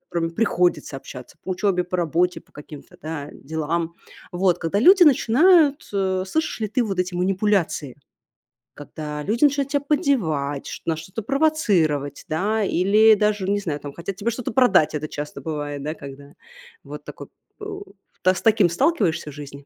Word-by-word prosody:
с - - -48
которыми 165 -1 -1
приходится 175 -6 0
общаться 125 -1 -11
по - - -6
учебе, 185 -1 0
по 180 +1 -3
работе, 175 +2 0
по - - -29
каким-то, 145 0 -12
да, 155 -2 -6
делам. 160 +3 -3 0.4
Вот 180 0 +1
когда 165 +4 -1
люди 370 - +7
начинают, 300 +2 +4
э, 190 -2 0
слышишь 315 +3 -2
ли 215 - -1
ты 245 +4 0
вот 195 -5 -3
эти 180 0 -1
манипуляции, 185 - 0 0.8
когда 150 0 -7
люди 225 - -1
начинают 280 -1 +3
тебя 285 - +1
поддевать, 165 - 0
ш - - -7
на 165 - 0
что-то 185 +7 -7
провоцировать, 200 - +1
да, 210 +7 0
или 205 +4 +4
даже, 210 -2 0
не 205 0 +1
знаю, 155 -7 -4
там 145 - -7
хотят 175 +5 -6
тебе 215 +5 -2
что-то 230 0 -5
продать. 195 - +4
Это 155 +1 -4
часто 145 -1 -6
бывает, 145 -1 -5
да, 155 +2 -4
когда 140 0 -11 0.5
вот - - -9
так - - -11
вот - - -9 0.3
у 410 -1 -7 0.4
да 185 0 +4
с - - -6
таким 215 -5 +4
сталкиваешься 170 - 0
в - - -13
жизни, 140 -1 -10
180 Hz, 175 wpm, -22 LUFS, 155-220 Hz, 0.8 s, люди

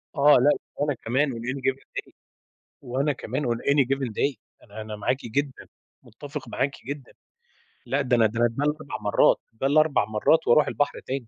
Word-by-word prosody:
آه 145 +1 +6
لأ 145 +4 +5 0.2
وأنا 145 0 0
كمان 130 +4 0
On 115 - -6
any 130 +4 -4
given 135 +1 -1
day - - -6 0.7
وأنا 135 +3 -1
كمان 130 +3 -4
On 120 -1 0
any 140 -2 +4
given 135 -3 -1
day، 140 +5 0 0.3
أنا 110 0 -9
أنا 110 0 -6
معاكِ 115 +5 0
جدًا، 135 +4 -3 0.4
متفق 145 +4 -9
معاكِ 135 +1 -1 0.2
جدًا. 140 -1 -6 0.7
لأ، 140 +2 0
ده 125 -2 +2
أنا 115 -2 +4
ده 110 +2 -1
أنا 120 - +5
ده 120 +5 -4
ال4 150 0 -2
مرات، 105 -1 +4 0.2
ده 135 +5 -1
ال4 155 -4 +3
مرات 110 +9 +2
وأرُوح 150 +6 +5
البحر 145 - -1
تاني 130 -3 -5
135 Hz, 185 wpm, -25 LUFS, 115-145 Hz, 0.7 s, آه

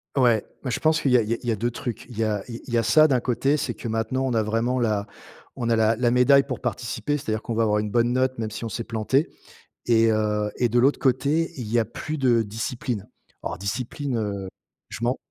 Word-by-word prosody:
Ouais, 120 -5 +3 0.2
mais 130 - -3
je - - -1
pense 155 0 +2
qu'il 140 - +1
y 125 - +7
a - - +4
il 105 - -6
y - - +2
a - - -1
il 120 - -3
y - - +3
a - - +1
2 120 +4 -1
trucs. 120 -1 -5
Il 120 -4 -11
y - - +3
a 105 -2 -1
il 115 -1 -7
y 120 - +2
a 115 - +2
ça 155 +7 +6
d'un 130 -3 +2
côté, 135 +5 +1
c'est 120 -4 -2
que 115 - -7
maintenant 115 +4 -1
on 125 - -1
a 110 - +2
vraiment 115 +4 0
la 105 -3 0 0.5
on 115 -1 -1
a - - +4
la 110 0 +3
la 120 0 +1
médaille 135 +3 +5
pour 135 -2 -5
participer, 120 +5 -2
c'est-à-dire 110 -4 -3
qu'on 115 - -4
va 115 - +2
avoir 105 -1 +2
une 105 0 -2
bonne 120 +2 +2
note 130 0 +1
même 110 -2 -3
si 110 - -6
on 115 - -3
s'est 115 - -4
planté 115 +7 0 0.6
et 115 -1 +4
heu, 105 -1 0
et 120 - +2
de 120 +2 +1
l'autre 135 +4 +4
côté, 145 +6 +1
il 120 -4 -5
y 120 - +3
a 110 - +2
plus 155 0 -5
de 120 -4 +3
discipline. 110 +1 -4 0.3
Alors - - -4
discipline, 125 +5 -3
heu, 100 -3 -3 0.4
je - - -6
m'en 125 +3 +1
120 Hz, 265 wpm, -24 LUFS, 110-130 Hz, 0.6 s, y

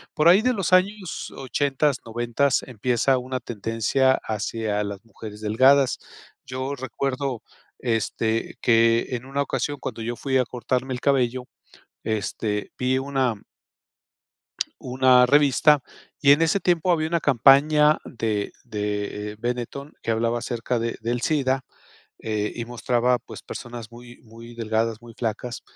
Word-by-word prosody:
Por 155 +2 +3
ahí 190 +4 +7
de 250 +1 +2
los 190 -4 -1
años 190 -1 +1
ochentas, 140 +1 0
noventas, 120 +4 0
empieza 125 +2 +1
una 130 +1 -4
tendencia 115 +4 +1
hacia 110 0 -2
las 100 +2 -6
mujeres 105 -2 -10
delgadas. 130 +5 +4 0.5
Yo 130 +2 -3
recuerdo, 130 -1 -3 0.4
este, 115 -1 -1
que 115 0 +4
en 125 0 -4
una 140 +1 -2
ocasión, 145 0 -2
cuando 115 -2 -5
yo 120 +2 -3
fui 130 0 0
a 125 - +2
cortarme 125 +2 -2
el 125 - -5
cabello, 130 -2 +1 0.6
este, 105 -1 -2
vi 130 +1 +1
una 130 -6 -1 1.4
Una 125 0 +4
revista 145 +2 +5 0.4
y 140 -1 +6
en 160 +3 +2
ese 165 +5 +2
tiempo 175 0 +2
había 160 -2 +1
una 170 0 0
campaña 150 +3 +5
de 110 -4 -2
de, 105 -2 -3
eh, - - -11
Benetton 125 +4 -4
que - - 0
hablaba 115 +1 0
acerca 120 0 -2
de 115 0 -2
del 120 +2 -2
SIDA, 135 -4 0 0.6
eh, 105 -1 -2
y 120 - -3
mostraba 120 +1 +1
pues - - -11
personas 120 -2 -8
muy 120 0 -13
muy 115 +1 -13
delgadas, 115 0 -1
muy 120 -1 -12
flacas 115 +1 -4
125 Hz, 140 wpm, -24 LUFS, 115-135 Hz, 1.4 s, ahí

